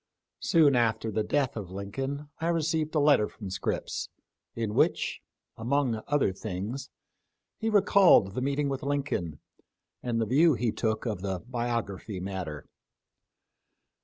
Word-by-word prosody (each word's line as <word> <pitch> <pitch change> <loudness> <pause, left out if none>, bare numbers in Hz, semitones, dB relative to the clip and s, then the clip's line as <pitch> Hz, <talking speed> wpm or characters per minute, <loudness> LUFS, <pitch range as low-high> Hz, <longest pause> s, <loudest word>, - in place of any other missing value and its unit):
Soon 155 -5 +4
after 110 -2 +1
the 110 - 0
death 135 +4 0
of 100 -5 -5
Lincoln 135 +10 -4
I 165 - -1
received 160 -2 0
a - - +4
letter 145 -7 +4
from 100 -5 -9
Scripps, 95 - -3 0.5
in 115 -2 -2
which, - - +1 0.3
among 120 -1 0
other 145 -9 +2
things, 105 +7 -5 0.7
he 225 - 0
recalled 195 - +5
the 125 - -2
meeting 140 +2 0
with 135 0 -2
Lincoln, 140 - -2 0.6
and 120 -2 -1
the 115 - +1
view 145 +7 +4
he 115 0 0
took 110 +1 -1
of 105 -6 -2
the 95 -1 -2
biography 115 -5 -3
matter. 90 -6 -5
120 Hz, 135 wpm, -28 LUFS, 100-145 Hz, 0.7 s, recalled